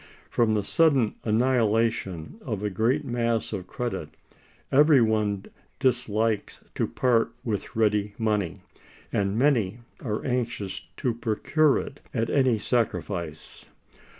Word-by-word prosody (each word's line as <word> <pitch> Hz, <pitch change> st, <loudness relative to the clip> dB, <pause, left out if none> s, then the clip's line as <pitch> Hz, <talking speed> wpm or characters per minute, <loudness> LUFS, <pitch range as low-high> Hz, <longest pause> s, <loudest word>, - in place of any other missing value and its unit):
From 115 Hz, -2 st, +2 dB
the 105 Hz, -1 st, +1 dB
sudden 140 Hz, -5 st, +3 dB
annihilation 115 Hz, -, +1 dB
of 110 Hz, -, -4 dB
a 105 Hz, -, -1 dB
great 120 Hz, +10 st, +1 dB
mass 115 Hz, -2 st, -1 dB
of 90 Hz, -1 st, -4 dB
credit, 120 Hz, +4 st, -4 dB, 0.6 s
every 145 Hz, 0 st, +6 dB
one 105 Hz, -3 st, +1 dB, 0.3 s
dislikes 115 Hz, -5 st, 0 dB
to -, -, 0 dB
part 120 Hz, -3 st, +1 dB
with 110 Hz, 0 st, -3 dB
ready 105 Hz, -2 st, +1 dB
money, 105 Hz, -6 st, -1 dB, 0.5 s
and 100 Hz, +1 st, 0 dB
many 120 Hz, -5 st, +2 dB, 0.2 s
are 110 Hz, -4 st, -3 dB
anxious 120 Hz, -7 st, -2 dB, 0.2 s
to 125 Hz, -, 0 dB
procure 120 Hz, +6 st, +2 dB
it 140 Hz, -, -6 dB, 0.2 s
at 115 Hz, -1 st, 0 dB
any 130 Hz, -5 st, +3 dB
sacrifice. 90 Hz, -9 st, -2 dB
115 Hz, 120 wpm, -26 LUFS, 105-125 Hz, 0.6 s, every